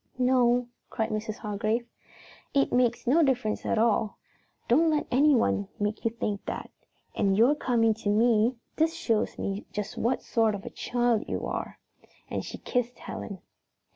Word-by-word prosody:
"No," 250 -1 +3 0.2
cried 220 0 -2
Mrs. 215 0 -3
Hargrave. 215 +3 -1 0.7
"It 275 - +2
makes 245 -1 +2
no 285 +7 +4
difference 250 -7 0
at - - +1
all. 220 -1 +2 0.5
Don't 320 +7 +4
let 305 -1 +1
anyone 245 - +3
make 210 +1 -2
you 230 - +2
think 210 -3 -3
that. - - -5 0.4
And 195 -1 +1
your 240 +6 +6
coming 235 -6 +2
to 220 - -15
tell 205 - +3
me 230 +2 +3 0.2
this 325 +1 +2
shows 235 -11 0
me 200 +1 -4
just 210 -1 -5
what 245 +3 0
sort 225 -2 +2
of 200 - -8
a - - -6
child 240 -3 0
you - - -3
are," - - -4 0.5
and - - -2
she - - -7
kissed 245 -1 -2
Helen. 195 -4 -7
230 Hz, 165 wpm, -28 LUFS, 215-250 Hz, 0.7 s, your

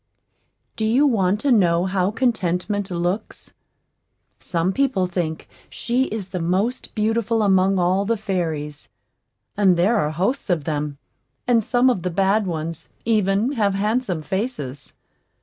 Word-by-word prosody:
Do 220 - -2
you 240 +7 +3
want 205 -7 +2
to 285 - +1
know 175 -6 +3
how 185 0 +1
Contentment 205 -4 -1
looks? 180 +4 -3 0.9
Some 175 +2 -1
people 260 -8 +1
think 175 -3 -3 0.2
she 250 +2 0
is 205 -5 -5
the 180 - -4
most 190 +9 -1
beautiful 225 0 +1
among 190 -1 +3
all 185 +2 +2
the 230 +2 0
fairies; 160 -7 -3 0.7
(and 190 -4 +3
there 200 +7 +3
are 150 -7 +1
hosts 195 - -2
of 170 -5 +1
them, 150 -1 -3 0.5
and 235 -3 +3
some 245 +2 +2
of 245 -8 +2
the 180 - -2
bad 195 +3 +1
ones, 165 -1 -5 0.2
even, 215 +1 +2
have 205 -7 +1
handsome 210 -4 -1
faces.) 190 - -4
195 Hz, 140 wpm, -22 LUFS, 175-225 Hz, 0.9 s, you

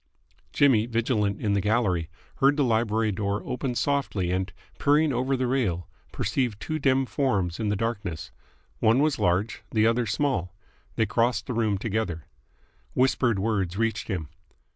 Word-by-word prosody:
Jimmy, 120 -6 +4
vigilant 115 -3 0
in 105 -2 0
the 100 - +2
gallery, 100 -6 +1 0.3
heard 140 +2 +4
the 145 - +3
library 110 -2 +1
door 100 0 -2
open 125 0 -3
softly 125 -11 0
and, 95 +1 -1 0.3
peering 150 0 +3
over 130 +2 0
the 130 - 0
rail, 110 - 0 0.2
perceived 120 -6 -1
two 155 0 -3
dim 135 -1 +2
forms 100 - -1
in 110 -2 0
the 105 - +1
darkness. 100 -6 -3 0.5
One 110 +2 +4
was 150 +1 +2
large, 90 +5 0
the 110 -1 +2
other 115 +1 +2
small. 95 -7 -1 0.4
They 110 - +2
crossed 120 +2 +1
the 125 - -4
room 110 -3 +1
together. 100 -6 -2 0.7
Whispered 125 -3 +2
words 95 -3 -1
reached 115 -1 -1
him. 90 -8 -3
110 Hz, 155 wpm, -26 LUFS, 100-130 Hz, 0.7 s, Jimmy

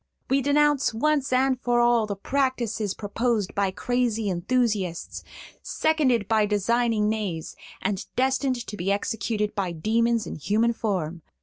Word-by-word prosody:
We 275 +1 +3
denounce 290 -3 +2
once 290 +2 +1
and 255 0 +2
for 240 -1 +2
all 240 -2 +3
the 200 - -3
practices 230 -3 -1
proposed 215 -1 -1
by 200 -1 +1
crazy 225 0 -1
enthusiasts, 195 -2 -1 0.4
seconded 265 -10 +1
by 215 -2 +3
designing 215 +1 +1
knaves, 205 -7 -3 0.3
and 195 0 -1
destined 260 -1 0
to 210 - -7
be 195 0 -1
executed 210 +1 -1
by 190 -4 -2
demons 230 +6 +1
in - - -6
human 220 +9 +1
form. 175 -7 -2
225 Hz, 135 wpm, -25 LUFS, 200-250 Hz, 0.4 s, We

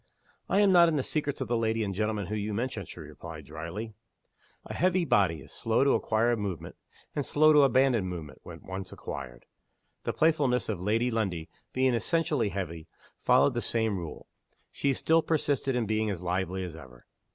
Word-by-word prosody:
"I 200 - +4
am 200 -2 +5
not 175 -2 +7
in 160 - 0
the 140 - +1
secrets 145 -2 -2
of 130 - -2
the 120 - 0
lady 115 -1 +1
and 100 -2 -2
gentleman 105 0 -1
whom 105 +3 -3
you 105 0 -3
mention," 125 +4 -3
she - - -10
replied, - - -9
dryly. 85 +8 -6 0.7
A - - -6
heavy 185 0 +2
body 85 - +2
is - - -14
slow 115 +3 +1
to 140 - +4
acquire 115 +2 +2
movement 100 -6 -5 0.4
and 145 - 0
slow 155 +3 +4
to 150 - +7
abandon 130 -6 +3
movement, 80 -6 -7
when - - -11
once 95 0 -6
acquired. 65 -4 -7 0.6
The - - -1
playfulness 145 -7 +2
of 100 -5 -2
Lady 115 +5 +1
Lundie, 95 -8 -2 0.2
being 130 0 +2
essentially 140 - +1
heavy, 85 -5 -5 0.3
followed - - +4
the - - -1
same 110 -3 0
rule. 85 -5 -6 0.5
She 140 -1 0
still 160 +5 +3
persisted 145 -4 0
in 120 -2 +1
being 110 0 0
as 95 -3 -4
lively 95 +1 -1
as 90 -3 -6
ever. 65 -6 -13
110 Hz, 185 wpm, -29 LUFS, 95-135 Hz, 0.7 s, not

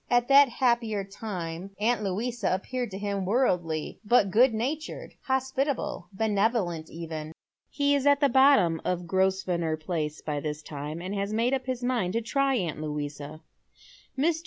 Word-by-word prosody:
At 245 +1 +2
that 280 0 +7
happier 235 -5 +1
time 195 -2 -6
auii,* 230 +2 +1
Louisa 215 +3 -1
appeared 245 +5 -4
to 190 - -6
him 200 -1 -2
worldly, 180 - 0
but 205 -3 +3
good 245 +6 +5
natured, 265 +8 -4
hospitable, 265 -6 -1
benevolent 200 -5 0
even. 160 -1 -6 0.4
He 285 0 +1
is 285 0 +1
at 285 0 +5
the 285 - +4
bottom 265 - +4
of 180 -1 -2
Grosvenor 185 -3 0
Place 155 -2 -3
by 150 -2 -2
this 150 +1 -4
time, 150 +3 -6
and 185 +2 -4
ha» 200 0 -1
made 230 +4 +1
up 265 -1 -2
his 255 -1 -3
mind 240 -8 0
to 230 - 0
try 275 +3 +1
aunt 170 -8 -2
Louisa. 150 0 -5 0.8
Mr. 320 +4 +2
200 Hz, 160 wpm, -27 LUFS, 170-250 Hz, 0.8 s, that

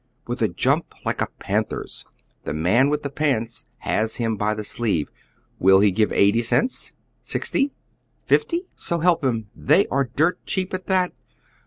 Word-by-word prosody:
With 120 +1 -4
a 110 - +4
jump 85 - 0
like - - -1
a - - +1
panther's, - - -3 0.4
the - - -4
man 105 - +3
with 150 0 -1
the 140 - -2
pants 130 -6 -1
has 110 +1 0
him 115 -2 -1
by 105 +1 0
the 110 - -4
sleeve. 105 -9 -1 0.5
Will 95 +1 +6
he 100 0 +4
give 105 +3 +1
eighty 100 +4 +4
cents? 240 - 0 0.3
Sixty? 280 -1 0 0.5
Fifty? 350 -5 +2
So 170 -1 -1
help 170 -2 +3
him, 115 -5 -1
they 155 +8 +4
are 135 -2 0
dirt 160 +5 +1
cheap 190 -2 -1
at 185 0 -4
that. 185 -2 +2
120 Hz, 165 wpm, -23 LUFS, 105-170 Hz, 0.5 s, Will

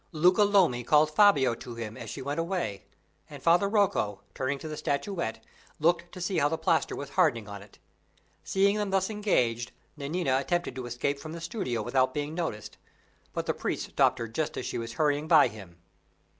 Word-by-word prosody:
Luca 180 +5 +4
Lomi 190 -12 +3
called 150 +4 +4
Fabio 150 - +5
to 115 +1 -8
him 110 -2 -6
as - - -8
she - - -6
went 145 +4 -3
away, 165 - -3 0.4
and - - -11
Father 175 +4 +4
Rocco, 195 - +1
turning 135 +2 -2
to 155 - -8
the 155 - -5
statuette, 140 - -3 0.3
looked 170 +2 +1
to 185 - -9
see 180 -1 0
how 145 0 +3
the 160 - -1
plaster 160 - +1
was 140 - -6
hardening 140 - +2
on 100 -1 -8
it. 100 0 -16 0.7
Seeing 200 +2 +2
them 210 -1 -1
thus 190 +2 +1
engaged, 125 - 0 0.2
Nanina 140 -2 0
attempted 175 +2 -1
to 125 -1 -6
escape 125 +4 -2
from 155 +2 -8
the 170 - -6
studio 165 - -3
without 130 +2 +1
being 145 +1 -2
noticed; 160 - -4 0.5
but - - -3
the - - 0
priest - - -3
stopped - - +3
her 115 -1 -4
just 150 +7 -3
as - - -3
she - - -3
was 115 0 -5
hurrying 150 +2 +1
by - - +6
him. 95 -6 -12
150 Hz, 195 wpm, -28 LUFS, 120-175 Hz, 0.7 s, by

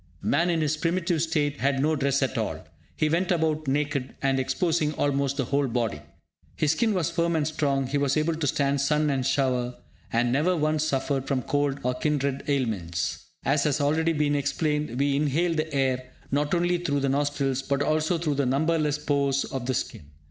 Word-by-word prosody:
Man 170 +5 +2
in 165 -2 +1
his 155 0 0
primitive 170 0 0
state 150 -3 0
had 135 0 +1
no 155 +3 +2
dress 140 -1 +1
at 130 - -1
all; - - -3 0.3
he 155 - +1
went 175 +4 +1
about 155 -3 0
naked, 140 -1 -1
and 135 -1 +1
exposing 155 +4 0
almost 140 -1 0
the 135 - 0
whole 140 +2 +1
body. 115 -4 -2 0.5
His 150 -2 +2
skin 220 +5 +1
was 170 -3 0
firm 170 0 0
and 155 -2 +1
strong, 140 -3 0
he 140 +3 -1
was 140 +1 +1
able 155 +2 +1
to 160 -2 -2
stand 140 +1 +1
sun 150 +1 +2
and 135 -2 0
shower, 130 -2 0 0.4
and 120 +1 +2
never 165 +7 +2
once 155 0 +1
suffered 135 -2 -1
from 130 -3 0
cold 145 -1 0
and 125 0 -1
kindred 140 -3 0
ailments. 105 - -2 0.2
As 140 +2 +2
has 150 0 +1
already 160 +3 +2
been 150 -1 +1
explained, 150 -2 -1
we 140 0 +2
inhale 155 +4 +1
the 160 0 -2
air 130 -2 0 0.2
not 145 +3 +1
only 175 0 +1
through 145 -5 -1
the 140 - +1
nostrils, 140 -1 0
but 140 +1 0
also 155 +3 +1
through 160 -3 -1
the 140 -1 0
numberless 150 +2 +1
pores 140 -2 +1
of 130 -2 -5
the 130 - 0
skin. 70 - -4
145 Hz, 195 wpm, -26 LUFS, 135-155 Hz, 0.5 s, Man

